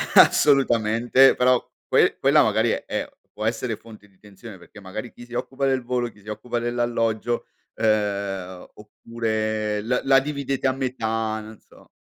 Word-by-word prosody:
assolutamente, 120 -1 +5
però 125 0 +3 0.3
que - - +3
quella - - +5
magari - - +2
è - - -3 0.2
può 105 +1 -6
essere 115 0 -2
fonte 110 -2 -15
di 95 - -30
tensione 100 0 -12
perché 90 +4 -15
magari 105 +5 -7
chi 120 - -12
si 120 - -15
occupa 135 +3 -3
del 130 -1 +1
volo, 120 -1 -1
chi 105 - -22
si 105 - -22
occupa 115 +3 -4
dell'alloggio, 120 -1 -1 0.3
ehm, 100 -4 -1
oppure 110 -1 -3
la 125 +3 -1
la 135 0 +5
dividete 140 -1 -2
a 130 - +2
metà, 115 -4 -2
non 110 0 -11
so. - - -21
115 Hz, 155 wpm, -23 LUFS, 105-125 Hz, 0.3 s, assolutamente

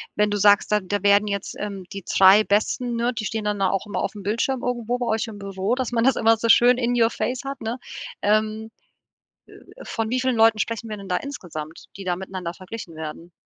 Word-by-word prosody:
wenn 210 0 +2
du 205 - 0
sagst, 205 +1 +4
da 210 - +4
da 205 +1 -3
werden 205 +1 +4
jetzt, 200 -1 -4
ähm 200 -2 -5
die 195 -2 -7
3 195 +3 +6
Besten, 235 +4 0
ne, 235 +2 0
die 220 -2 -4
stehen 220 0 -3
dann 210 -1 -1
da 190 - +2
auch 195 +1 -1
immer 205 - -3
auf - - -2
'm 200 - -8
Bildschirm 235 +5 -1
irgendwo 245 -1 -1
bei 245 - -1
euch 220 +1 0
im 210 -2 -8
Büro, 195 +3 -2
dass 255 -2 -3
man 235 0 +1
das 265 - +4
immer 225 0 +4
so 230 - -1
schön 245 +2 +6
in 245 0 0
your 225 0 +5
face 255 +2 -3
hat, 275 0 -5
ne? 225 +3 -4 0.4
Ähm, 215 +1 0 1.0
äh, - - -11
von 225 -1 -3
wie 255 +1 0
vielen 255 -3 0
Leuten 225 -1 +5
sprechen 230 +1 -2
wir 215 - -4
denn 200 -1 -10
da 180 - +1
insgesamt, 165 - -7
die 195 - -8
da 175 -1 0
miteinander 185 -2 -6
verglichen 185 -2 -9
werden? 160 +2 -7
215 Hz, 235 wpm, -23 LUFS, 195-235 Hz, 1.0 s, 3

